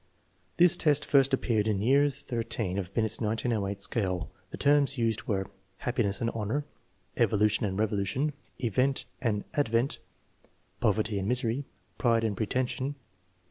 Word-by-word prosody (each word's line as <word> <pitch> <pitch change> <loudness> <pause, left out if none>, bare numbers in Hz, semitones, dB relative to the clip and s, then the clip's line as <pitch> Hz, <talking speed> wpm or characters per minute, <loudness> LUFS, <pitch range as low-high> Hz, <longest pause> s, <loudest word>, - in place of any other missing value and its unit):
This 175 0 +5
test 150 -2 +3
first 135 -1 +4
appeared 115 -5 +1
in 105 -3 +1
year 140 +7 +4
XIII 115 -7 -3
of 95 -2 -3
Binet's 110 +2 -1
1908 105 -2 -1
scale. 95 -7 -1 0.2
The - - -7
terms 140 -1 +3
used 115 -2 0
were 95 -2 0 0.3
"happiness 110 -5 -1
and 115 - 0
honor"; 115 +7 -2 0.3
" 95 -1 -28
evolution 105 -2 +2
and 95 -1 -3
revolution 110 +7 0
"; - - -35
" - - -39
event 130 +5 +1 0.2
and 105 -5 0
advent; 120 -2 +1 0.8
"poverty 105 -1 +1
and 95 - -3
misery"; 125 +2 0 0.3
"pride 115 -2 +3
and 110 -2 0
pretension." 130 +5 -1
115 Hz, 145 wpm, -29 LUFS, 105-130 Hz, 0.8 s, This